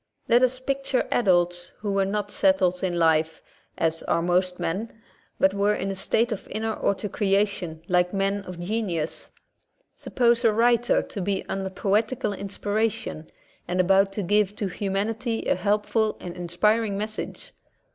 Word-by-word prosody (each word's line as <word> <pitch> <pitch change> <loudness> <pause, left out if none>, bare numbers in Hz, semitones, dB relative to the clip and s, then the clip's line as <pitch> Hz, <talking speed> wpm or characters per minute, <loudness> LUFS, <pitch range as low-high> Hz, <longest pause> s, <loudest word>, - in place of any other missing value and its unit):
Let 240 +1 +5
us 255 0 +2
picture 270 0 -1
adults 175 -5 +2
who 205 -2 -2
were 195 0 +2
not 205 0 -2
settled 185 -2 +2
in 175 -2 0
life, 160 -1 +2 0.3
as 165 0 +1
are 170 - 0
most 180 +1 +1
men, 220 +6 -3 0.4
but 190 0 +4
were 200 +1 +2
in 195 0 -2
a - - -4
state 230 +5 +1
of 215 - -5
inner 220 0 -2
autocreation 195 -4 0
like 180 0 +2
men 195 0 0
of 180 -1 -8
genius. 175 -4 -3 0.7
Sup - - -11
pose 235 -1 +4
a 225 - +5
writer 235 +2 +3
to 200 - -6
be 195 +1 -1
under 190 0 -3
poetical 210 +5 0
inspiration, 205 -3 -3 0.4
and 180 +1 -2
about 195 +2 +4
to 205 - -2
give 205 +2 +2
to 205 -2 -2
humanity 210 +5 -2
a - - +3
helpful 215 +1 0
and 175 -1 -7
inspiring 200 +5 +1
message. 215 +1 -6
200 Hz, 155 wpm, -25 LUFS, 180-220 Hz, 0.7 s, Let